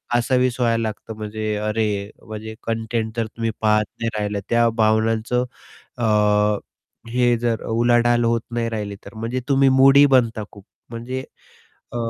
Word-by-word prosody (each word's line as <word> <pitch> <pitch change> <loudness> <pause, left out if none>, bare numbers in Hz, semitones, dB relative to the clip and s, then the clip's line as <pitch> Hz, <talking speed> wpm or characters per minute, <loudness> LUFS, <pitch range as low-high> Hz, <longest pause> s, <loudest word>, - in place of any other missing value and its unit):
कासावीस 125 +1 +1
व्हायला 115 -1 +2
लागतं. 110 0 -5
म्हणजे 110 0 -3
अरे, 105 -1 -1 0.2
म्हणजे 110 0 -7
कंटेंट 115 0 -2
जर 115 - 0
तुम्ही 115 +1 -3
पाहत 105 -1 +3 0.2
नाही 115 - -1
राहिला, 105 -1 -2
त्या 115 0 +3
भावनांचं 110 +3 +2 0.5
अ, 120 - -1 1.1
हे 120 0 +2
जर 115 -1 -1
उलाढाल 120 +1 +3
होत 115 0 +2
नाही 115 -1 -1
राहिली, 105 -3 -4
तर - - -12
म्हणजे 115 +3 -3
तुम्ही 135 -1 +4
मूडी 135 +1 +7
बनता 115 -3 +1
खूप. 100 -2 -14 0.3
म्हणजे 125 +3 -5 0.7
अ, - - -5
115 Hz, 145 wpm, -21 LUFS, 110-120 Hz, 1.1 s, मूडी